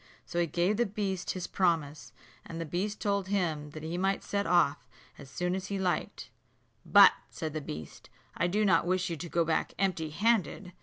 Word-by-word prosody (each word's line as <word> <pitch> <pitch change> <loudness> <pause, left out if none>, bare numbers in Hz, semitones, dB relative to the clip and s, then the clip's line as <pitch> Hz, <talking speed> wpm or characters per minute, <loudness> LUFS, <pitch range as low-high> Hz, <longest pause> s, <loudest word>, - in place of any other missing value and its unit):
So 170 - -3
he 170 - +2
gave 175 +6 +1
the 240 -1 +2
beast 195 -2 -3
his 180 - -4
promise; 160 -5 -1 0.3
and 165 - -8
the 165 - -3
beast 190 +7 -3
told 200 -2 0
him 160 -7 -1
he 160 +3 -5
might 195 +1 +1
then - - -16
set 200 -3 0
off 165 -4 +2 0.3
as 140 - -11
soon 180 +6 -2
as 190 +1 -3
he 200 - -3
liked. 185 -2 -2 0.5
"But," - - +8 0.2
said 155 -2 -5
the 155 - -3
beast, 80 - -8 0.3
"I 170 - +1
do 210 +4 +1
not 175 -3 +3
wish 185 -1 0
you 165 - -3
to 170 +3 -7
go 170 0 +1
back 160 - -1
empty 180 -5 0
handed. 200 0 0
175 Hz, 200 wpm, -30 LUFS, 160-195 Hz, 0.5 s, But